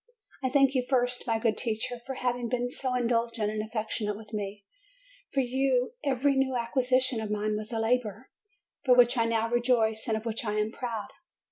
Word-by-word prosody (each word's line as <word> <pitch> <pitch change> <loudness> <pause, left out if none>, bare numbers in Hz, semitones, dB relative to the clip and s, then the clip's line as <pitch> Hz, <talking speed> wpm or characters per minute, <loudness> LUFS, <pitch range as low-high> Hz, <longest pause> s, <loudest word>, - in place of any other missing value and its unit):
I 260 - 0
thank 275 0 +4
you 255 -2 +1
first, 245 -2 +1
my 225 -1 +2
good 225 -1 +1
teacher, 230 +2 -3
for 265 - -3
having 245 -2 -1
been 245 0 -1
so 255 -1 -2
indulgent 230 -3 0
and 215 0 -2
affectionate 215 -1 -3
with 220 0 -13
me; 205 -1 -4 0.7
for 275 - +2
you 260 - +1
every 275 +1 +2
new 265 -1 +1
acquisition 255 0 +1
of 215 - -4
mine 210 0 0
was 215 +1 -5
a 230 - -2
labor, 225 0 -1 0.5
for 255 -3 +5
which 245 +1 +6
I 230 -2 +2
now 230 0 +1
rejoice 235 -2 +1
and 220 -1 +1
of 220 - -7
which 230 0 -2
I 210 -2 -1
am 215 +1 0
proud. 235 -1 -4
235 Hz, 195 wpm, -29 LUFS, 220-255 Hz, 0.7 s, which